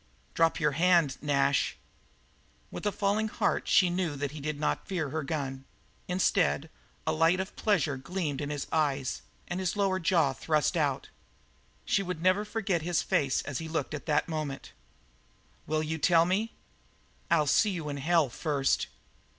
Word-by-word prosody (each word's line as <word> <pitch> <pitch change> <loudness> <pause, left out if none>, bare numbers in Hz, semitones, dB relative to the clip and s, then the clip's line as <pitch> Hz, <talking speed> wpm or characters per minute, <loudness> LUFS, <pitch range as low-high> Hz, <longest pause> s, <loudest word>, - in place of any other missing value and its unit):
"Drop 165 +1 +2
your 150 -3 +2
hand, 165 -2 +3
Nash." 140 -1 +1 0.9
With - - -4
a - - +2
falling 205 +2 0
of - - -9
the - - -14
heart, - - +1
she 180 -2 +4
knew 175 -4 -1
that 140 -1 -3
he 150 - -8
did 150 0 -3
not 150 - -1
fear 175 -7 -2
her 160 +1 -1
gun; 135 -2 -4 0.4
instead, 180 -4 +1 0.3
a - - +1
light 165 +3 +3
of 190 +1 -4
pleasure 165 -10 +1
gleamed 150 -1 -3
in 145 - -3
his 145 -2 -3
eyes 140 -4 0 0.3
and 175 - -3
his 185 +1 -1
lower 195 -2 +1
jaw 165 -6 +2
thrust 155 +5 0
out. 145 -5 0 0.8
She - - +2
would 180 -3 -4
never 185 +3 +3
forget 205 -5 -1
his 170 +1 0
face 135 -3 +1
as 145 -3 -4
he 160 - -5
looked 160 0 -2
that 150 -2 +1
moment. 155 -4 -4 1.0
"Will 155 0 0
you 160 +1 -3
tell 165 +1 +5
me?" 205 +6 0 0.8
"I'll 165 -3 +4
see 210 +8 +3
you 170 -6 -4
in 145 -1 -3
hell 160 +2 +3
first." 140 +1 0
160 Hz, 170 wpm, -29 LUFS, 145-180 Hz, 1.0 s, tell